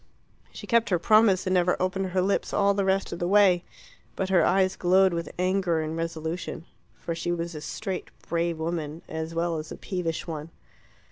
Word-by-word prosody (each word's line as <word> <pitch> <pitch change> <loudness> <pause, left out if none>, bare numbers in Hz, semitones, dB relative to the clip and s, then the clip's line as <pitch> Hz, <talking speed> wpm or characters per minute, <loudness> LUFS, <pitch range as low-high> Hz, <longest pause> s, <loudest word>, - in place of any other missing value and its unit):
She - - -9
kept 235 -1 +2
her 180 - +3
promise, 210 +1 +4
and 185 - 0
never 180 -1 +2
opened 185 +1 -1
her 185 0 0
lips 200 +1 0
all 200 0 +3
the 200 0 0
rest 195 0 +1
of 170 - -5
the 175 - -1
way. 190 -3 +5 0.5
But 190 - -2
her 185 -3 +4
eyes 190 +1 +3
glowed 185 +1 +4
with 170 0 -3
anger 185 -2 +1
and 155 +1 -3
resolution. 165 0 -4 0.3
For 170 - -5
she 170 +1 -3
was 170 0 -3
a 150 - -7
straight, 195 +3 -5 0.2
brave 170 -1 0
woman, 160 -1 -4
as 160 +1 -5
well 170 0 0
as 155 - -8
a - - -6
peevish 175 -4 -3
one. 155 -2 -6
175 Hz, 195 wpm, -26 LUFS, 165-190 Hz, 0.5 s, way